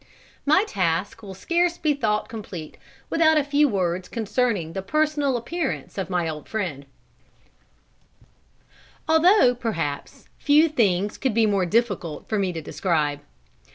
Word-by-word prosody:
My 310 +7 +5
task 185 - -1
will 195 -3 -9
scarce 345 - 0
be 305 -3 +1
thought 215 -6 -1
complete 195 -9 -8 0.4
without 315 -1 +4
a 300 - +3
few 290 +1 +3
words 180 -3 -1
concerning 220 -6 -1
the 190 - -3
personal 295 +2 0
appearance 305 +5 -4
of 195 -1 -4
my 175 -3 0
old 155 -2 -6
friend; 170 -11 -4 2.2
although, 320 -4 +5
perhaps, 165 -12 -4
few 305 +2 +4
things 205 - 0
could 260 -5 -1
be 230 -1 +4
more 200 -4 +1
difficult 205 -7 -1
for 215 - -1
me 190 -2 0
to 165 -2 -5
describe. 150 -4 -1
215 Hz, 135 wpm, -24 LUFS, 180-290 Hz, 2.2 s, My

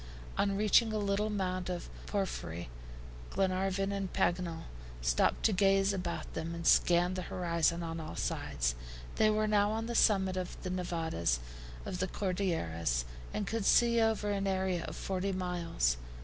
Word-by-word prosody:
On 200 -1 +1
reaching 215 +2 +4
a 215 - -1
little 205 +1 0
mound 185 -3 -2
of 175 -1 -4 0.2
porphyry, 85 - -3 0.6
Glenarvan 195 +1 0
and 195 -2 -3
Paganel 170 -2 0 0.4
stopped - - +2
to 220 - +4
gaze 195 +1 +3
about 170 -4 -4
them 165 +1 -4
and 170 0 -6
scan 175 +1 +4
the 185 - -3
horizon 170 -1 0
on 165 0 -4
all 155 -1 -6
sides. - - -1 0.4
They 215 - +5
were 215 0 +2
now 205 -1 +3
on 220 +1 -2
the 235 - -3
summit 190 -5 +3
of 185 -1 -4
the 185 - -3
Nevadas 165 - -1 0.5
of 180 - -4
the 185 - 0
Cordilleras, 85 - -1 0.3
and 210 - -2
could 225 +1 -2
see 235 +1 +5
over 220 -2 +1
an 200 -1 -1
area 190 -2 0
of - - -6
forty 195 0 -2
miles. 175 - 0
185 Hz, 160 wpm, -32 LUFS, 170-200 Hz, 0.6 s, They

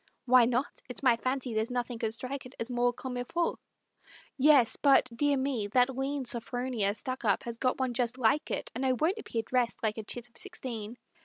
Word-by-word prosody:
"Why 255 -1 +6
not? 250 +3 -1
It's 250 - -5
my 250 -3 +6
fancy, 255 0 -2
there's 220 +2 0
nothing 245 -1 -3
could 225 -1 -2
strike 260 +1 -5
it 255 - -17
As 230 +2 -3
more 245 0 +2
comme 250 +1 -6
it 245 0 -5
faut" 340 0 0 0.8
"Yes, 275 -4 +5
but, 275 -3 +5
dear 290 +2 +2
me, 260 -6 -1
that 250 +1 +4
lean 270 +1 -2
Sophronia 240 -4 -1
Stuckup 235 -3 -1
has 235 -1 -5
got 255 0 +1
one 260 -2 0
just 240 0 0
like 255 +5 +2
it, - - -3
And 250 - -3
I 260 -1 +3
won't 325 - 0
appear 230 - -3
dressed 245 0 0
like 220 0 0
a - - -5
chit 240 +3 -6
of 235 - -20
sixteen." 245 - -6
250 Hz, 210 wpm, -30 LUFS, 235-265 Hz, 0.8 s, Why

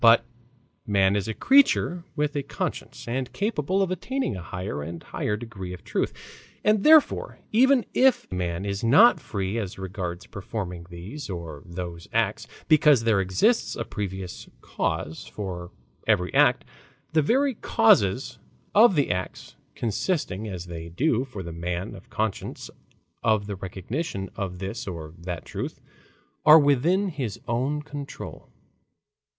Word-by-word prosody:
But 115 0 +7 0.6
man 100 -1 +3
is 100 -1 -1
a 110 - -3
creature 265 -10 +4
with 150 0 0
a 145 - +1
conscience 135 - -5
and 125 +2 -2
capable 195 -2 0
of 185 - -2
attaining 260 - -2
a 90 - -6
higher 90 -2 -5
and 85 +3 -7
higher 105 - -2
degree 100 -6 -7
of 90 - -10
truth. - - -1 0.5
And 210 -1 +3
therefore 310 -1 +5
even 255 +2 +5
if 260 -1 +4
man 90 0 -2
is 100 +1 -3
not 155 - +7
free 100 0 -3
as 100 -4 -5
regards 95 -2 -5
performing 90 -4 -6
these 100 - -8
or 85 -5 -6
those 85 -1 -6
acts - - 0 0.2
because 150 -5 +5
there 110 -4 +3
exists 95 - +2
a - - -3
previous 95 -4 -5
cause 80 +2 -3
for 90 -4 -6 0.4
every 100 -5 +2
act, 140 -3 +4 0.5
the 155 - +5
very 265 - +2
causes 110 - +3 0.3
of 215 -2 +7
his 140 - +2
acts, 90 +1 -4 0.2
consisting 110 - -1
as 90 -4 -5
they 85 -1 -7
do 125 - +1
for 105 -8 -7
the 85 -1 -7
man 85 +3 -3
of 105 +5 -13
conscience 110 -3 -3 0.5
of 110 -2 +2
the 100 -1 -4
recognition 95 - -4
of 95 -3 -4
this 95 +2 -5
or 80 -4 -6
that 85 -1 -5
truth, - - -5 0.6
are 155 +1 +10
within 160 +7 +3
his 130 - -4
own 135 +6 0
control. 145 -1 -8
105 Hz, 145 wpm, -26 LUFS, 90-150 Hz, 0.6 s, are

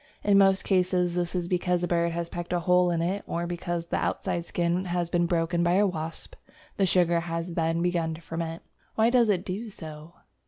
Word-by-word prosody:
In 200 -1 +5
most 195 -1 +4
cases 180 -2 +1
this 175 0 -1
is 175 -1 -1
because 180 0 0
a - - +1
bird 170 0 +1
has 170 0 -2
pecked 175 +1 -5
a 175 - +1
hole 180 +1 +3
in 165 -1 0
it, 190 +4 -1
or 170 +1 -2
because 175 -1 -3
the - - -2
outside 170 -1 -2
skin 175 +2 -1
has 175 -1 -2
been 175 -1 +2
broken 170 0 0
by 175 0 +2
a 200 +3 +4
wasp. 165 -4 -5 0.4
The 195 - +3
sugar 175 -1 +3
has 165 +1 -4
then 165 0 0
begun 170 -2 0
to 165 - -12
ferment. 165 0 -5 0.3
Why 225 +2 +3
does 240 -3 +4
it 190 -2 +1
do 205 +5 -4
so? 155 -3 -10
175 Hz, 210 wpm, -27 LUFS, 170-180 Hz, 0.4 s, In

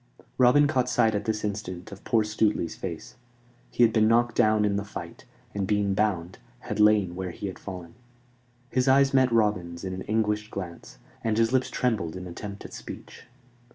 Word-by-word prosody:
Robin 130 +4 +6
caught 130 -4 +1
sight 110 -1 +3
at 105 -1 -2
this 110 -1 -1
instant 100 -2 -5
of 100 - -11
poor 115 -2 +2
Stuteley's 105 -5 0
face. 95 +8 -7 0.5
He 120 - +2
had 115 -2 +4
been 110 -1 +4
knocked 120 +1 +3
down 110 -2 +3
in 100 -1 +1
the 100 - -1
fight, 100 - -9 0.3
and, 100 -2 -2
being 105 -2 +1
bound, 95 -4 -1 0.2
had - - -5
lain 105 -4 +4
where 95 0 -4
he 85 - -7
had 95 - -5
fallen. 90 -4 -8 0.8
His 130 +1 +1
eyes 135 +1 +5
met 130 -2 +4
Robin's 100 -7 0
in 95 -1 -4
an 95 - -5
anguished 105 -1 0
glance, 90 -5 -8 0.3
and 110 -1 0
his 115 +2 +2
lips 130 -1 +2
trembled 110 -10 -1
in 90 0 -6
attempt 100 +3 -8
at - - -10
speech. - - -10
105 Hz, 190 wpm, -26 LUFS, 95-115 Hz, 0.8 s, Robin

